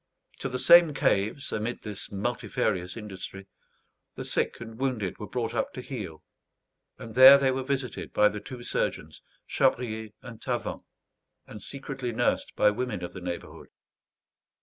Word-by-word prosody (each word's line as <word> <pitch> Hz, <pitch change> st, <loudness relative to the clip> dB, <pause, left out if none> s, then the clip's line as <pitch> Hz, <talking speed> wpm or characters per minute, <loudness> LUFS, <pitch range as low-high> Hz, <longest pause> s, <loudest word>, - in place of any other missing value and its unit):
To 135 Hz, -, -3 dB
the 130 Hz, -, -3 dB
same 170 Hz, +2 st, +7 dB
caves, 110 Hz, +2 st, +1 dB
amid 110 Hz, +3 st, -3 dB
this 105 Hz, -2 st, -6 dB
multifarious 100 Hz, -3 st, -2 dB
industry, 100 Hz, -2 st, -8 dB, 0.7 s
the -, -, -6 dB
sick -, -, -1 dB
and 115 Hz, -1 st, -9 dB
wounded 125 Hz, -8 st, -2 dB
were 105 Hz, -, -6 dB
brought 115 Hz, -2 st, -3 dB
up 115 Hz, -, -1 dB
to 125 Hz, -, -6 dB
heal; 105 Hz, -, -7 dB, 0.7 s
and 115 Hz, 0 st, -9 dB
there 130 Hz, +3 st, +10 dB
they 135 Hz, -1 st, +2 dB
were 130 Hz, +1 st, -1 dB
visited 130 Hz, -1 st, -3 dB
by 105 Hz, -, +5 dB
the 105 Hz, -, -6 dB
two 120 Hz, +2 st, -9 dB
surgeons, 80 Hz, -8 st, -2 dB, 0.2 s
Chabrier 110 Hz, -3 st, 0 dB
and 120 Hz, -4 st, -10 dB
Tavan, -, -, -3 dB, 0.6 s
and 105 Hz, -, -10 dB
secretly 135 Hz, 0 st, -5 dB
nursed 110 Hz, -, 0 dB
by 105 Hz, -, +4 dB
women 125 Hz, +1 st, -3 dB
of 85 Hz, -, -6 dB
the 95 Hz, -, -8 dB
neighbourhood. 90 Hz, -1 st, -6 dB
115 Hz, 150 wpm, -28 LUFS, 105-130 Hz, 0.7 s, there